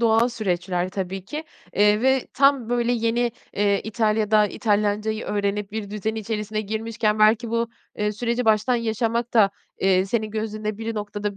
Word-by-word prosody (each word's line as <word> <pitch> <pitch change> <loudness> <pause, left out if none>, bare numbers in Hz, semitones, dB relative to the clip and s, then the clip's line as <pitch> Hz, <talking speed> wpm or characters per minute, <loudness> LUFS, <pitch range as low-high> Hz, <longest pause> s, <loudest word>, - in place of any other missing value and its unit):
doğal 230 +1 +4
süreçler 180 -5 -1
tabii 190 0 -4
ki. 300 +9 -5 0.3
Eee, 210 +2 +4
ve 265 0 +3
tam 275 -4 +3
böyle 240 0 +1
yeni, 235 0 +1 0.2
eee, 200 -1 +2
İtalya'da 215 -1 +2
İtalyancayı 210 0 0
öğrenip 205 0 -2
bir 215 -2 -4
düzen 215 +1 -2
içerisine 215 -1 -3
girmişken, 220 0 -1
belki 220 +2 +4
bu, 230 0 0 0.3
eee, 210 0 0
süreci 235 +3 -1
baştan 220 +2 +3
yaşamak 230 +1 -1
da, 205 -3 +6 0.3
eee, 190 0 +3
senin 215 0 -1
gözünde 215 -1 -3
biri 225 0 -3
noktada 205 -1 -4
215 Hz, 155 wpm, -23 LUFS, 205-230 Hz, 0.3 s, da